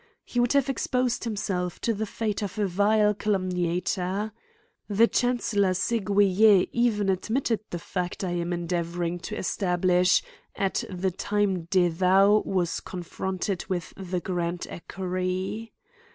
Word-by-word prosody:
He 245 Hz, -, -3 dB
would 240 Hz, +1 st, +3 dB
have 280 Hz, -1 st, +3 dB
exposed 250 Hz, -2 st, 0 dB
himself 190 Hz, -5 st, -2 dB
to 230 Hz, -, +1 dB
the 215 Hz, +1 st, -3 dB
fate 215 Hz, -1 st, -2 dB
of 205 Hz, 0 st, -4 dB
a 210 Hz, -, +1 dB
vile 210 Hz, +3 st, +3 dB
calumniator. 185 Hz, 0 st, -1 dB, 0.6 s
The 215 Hz, +3 st, +5 dB
chancellor 225 Hz, -7 st, +1 dB
Seguier 205 Hz, -1 st, +4 dB
even 225 Hz, -4 st, +1 dB
admitted 225 Hz, +5 st, 0 dB
the 175 Hz, -, -3 dB
fact 180 Hz, +2 st, -4 dB
I 185 Hz, -, -1 dB
am 175 Hz, 0 st, -2 dB
endeavouring 175 Hz, 0 st, -2 dB
to 170 Hz, -, -6 dB
es -, -, -2 dB
tablish, 180 Hz, -1 st, +3 dB, 0.3 s
at 195 Hz, -1 st, 0 dB
the 185 Hz, 0 st, -1 dB
time 195 Hz, -2 st, 0 dB
De 180 Hz, 0 st, +3 dB
Thou 190 Hz, +5 st, +4 dB
was 180 Hz, -3 st, 0 dB
confronted 185 Hz, +1 st, -4 dB
with 175 Hz, -3 st, -3 dB
the 185 Hz, -1 st, -3 dB
grand 175 Hz, 0 st, -2 dB
Equerry. 185 Hz, +4 st, -3 dB
190 Hz, 135 wpm, -26 LUFS, 180-210 Hz, 0.6 s, The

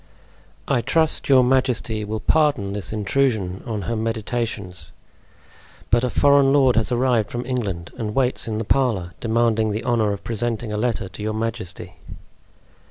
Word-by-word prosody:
"I 120 Hz, -, +2 dB
trust 155 Hz, +7 st, 0 dB
your 130 Hz, -2 st, +6 dB
majesty 125 Hz, -4 st, +1 dB
will 110 Hz, +1 st, -3 dB
pardon 145 Hz, -11 st, +2 dB
this 100 Hz, -4 st, -4 dB
intrusion 105 Hz, -3 st, 0 dB
on 105 Hz, -3 st, -3 dB
her 115 Hz, -, -2 dB
meditations, 110 Hz, -6 st, -3 dB, 1.0 s
but 120 Hz, +1 st, +4 dB
a 125 Hz, -, +1 dB
foreign 140 Hz, +2 st, +4 dB
lord 135 Hz, -3 st, +4 dB
has 115 Hz, 0 st, +1 dB
arrived 120 Hz, -3 st, +2 dB
from 120 Hz, +1 st, -4 dB
England 105 Hz, -10 st, -3 dB
and 110 Hz, -3 st, -4 dB
waits 130 Hz, -3 st, 0 dB
in 110 Hz, -1 st, -2 dB
the 110 Hz, -, -2 dB
parlor, 105 Hz, -8 st, 0 dB
demanding 115 Hz, -1 st, +1 dB
the 105 Hz, +2 st, -3 dB
honor 115 Hz, -4 st, +1 dB
of 100 Hz, -1 st, -5 dB
presenting 115 Hz, -1 st, -3 dB
a -, -, -1 dB
letter 115 Hz, -3 st, -1 dB
to -, -, -10 dB
your 110 Hz, 0 st, -2 dB
majesty." 110 Hz, -3 st, -5 dB
115 Hz, 160 wpm, -22 LUFS, 105-125 Hz, 1.0 s, your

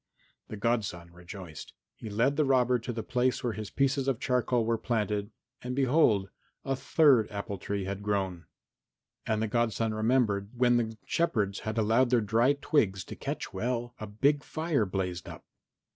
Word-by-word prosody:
The 110 Hz, -, -7 dB
godson 100 Hz, -7 st, -2 dB
rejoiced. 90 Hz, -3 st, -10 dB, 0.2 s
He 110 Hz, -, -8 dB
led 115 Hz, +7 st, +1 dB
the 155 Hz, -, +3 dB
robber 125 Hz, -2 st, +3 dB
to 115 Hz, +2 st, -5 dB
the 115 Hz, -2 st, -4 dB
place 125 Hz, +1 st, 0 dB
where 120 Hz, -2 st, 0 dB
his 110 Hz, -1 st, -6 dB
pieces 135 Hz, 0 st, +1 dB
of 130 Hz, -4 st, 0 dB
charcoal 125 Hz, -2 st, +1 dB
were 115 Hz, 0 st, 0 dB
planted 105 Hz, -3 st, -1 dB, 0.3 s
and 125 Hz, +1 st, -4 dB
behold! 130 Hz, -8 st, +3 dB, 0.3 s
a 135 Hz, -, 0 dB
third 135 Hz, -4 st, +4 dB
apple 100 Hz, -1 st, -5 dB
tree 100 Hz, +1 st, -3 dB
had 100 Hz, +1 st, -4 dB
grown. 95 Hz, -4 st, -2 dB, 0.8 s
And 110 Hz, 0 st, +1 dB
the -, -, 0 dB
godson 115 Hz, 0 st, 0 dB
remembered 110 Hz, -3 st, +1 dB
that -, -, -16 dB
when 120 Hz, 0 st, +4 dB
the 110 Hz, -2 st, -2 dB
shepherds 105 Hz, -, 0 dB
had 110 Hz, +1 st, -4 dB
allowed 115 Hz, +4 st, +3 dB
their 125 Hz, -1 st, +4 dB
dry 115 Hz, +5 st, +3 dB
twigs 110 Hz, -, +1 dB
to -, -, -8 dB
catch -, -, -5 dB
well, 120 Hz, 0 st, -2 dB
a 110 Hz, -, -5 dB
big 140 Hz, +8 st, +1 dB
fire 155 Hz, -, -1 dB
blazed 90 Hz, -3 st, -3 dB
up. -, -, -10 dB
115 Hz, 175 wpm, -29 LUFS, 100-125 Hz, 0.8 s, third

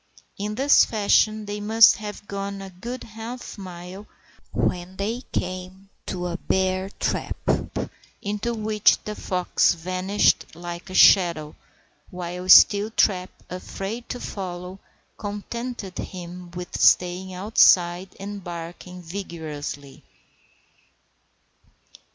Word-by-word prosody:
In 210 Hz, +1 st, -3 dB
this 275 Hz, +4 st, +6 dB
fashion 215 Hz, 0 st, +2 dB
they 205 Hz, 0 st, -4 dB
must 220 Hz, +2 st, +6 dB
have 210 Hz, -1 st, -8 dB
gone 200 Hz, 0 st, -4 dB
a 195 Hz, -1 st, -8 dB
good 235 Hz, +8 st, -7 dB
half 225 Hz, +3 st, -8 dB
mile 185 Hz, +2 st, -9 dB, 0.4 s
when 180 Hz, +1 st, -1 dB
they 220 Hz, +5 st, -2 dB
came 185 Hz, +2 st, -5 dB, 0.2 s
to 180 Hz, -1 st, -3 dB
a 175 Hz, -1 st, -3 dB
bear 190 Hz, 0 st, 0 dB
trap, -, -, -2 dB, 0.8 s
into 210 Hz, +4 st, -2 dB
which 215 Hz, -1 st, +3 dB
the 210 Hz, -, -3 dB
fox 180 Hz, -3 st, +1 dB
vanished 185 Hz, +2 st, +1 dB
like 175 Hz, +2 st, -7 dB
a 185 Hz, -, -7 dB
shadow, 170 Hz, -5 st, +5 dB, 0.5 s
while 180 Hz, 0 st, -6 dB
Steeltrap, 200 Hz, -3 st, +6 dB, 0.2 s
afraid 195 Hz, +5 st, -6 dB
to 245 Hz, -, -4 dB
follow, 180 Hz, -2 st, -6 dB, 0.4 s
contented 210 Hz, 0 st, -5 dB
himself 180 Hz, -1 st, -8 dB
with 180 Hz, 0 st, -5 dB
staying 180 Hz, +1 st, +3 dB
outside 185 Hz, -2 st, +4 dB
and 200 Hz, 0 st, -6 dB
barking 175 Hz, +1 st, -8 dB
vigorously. 155 Hz, -6 st, -7 dB
190 Hz, 105 wpm, -24 LUFS, 180-210 Hz, 0.8 s, this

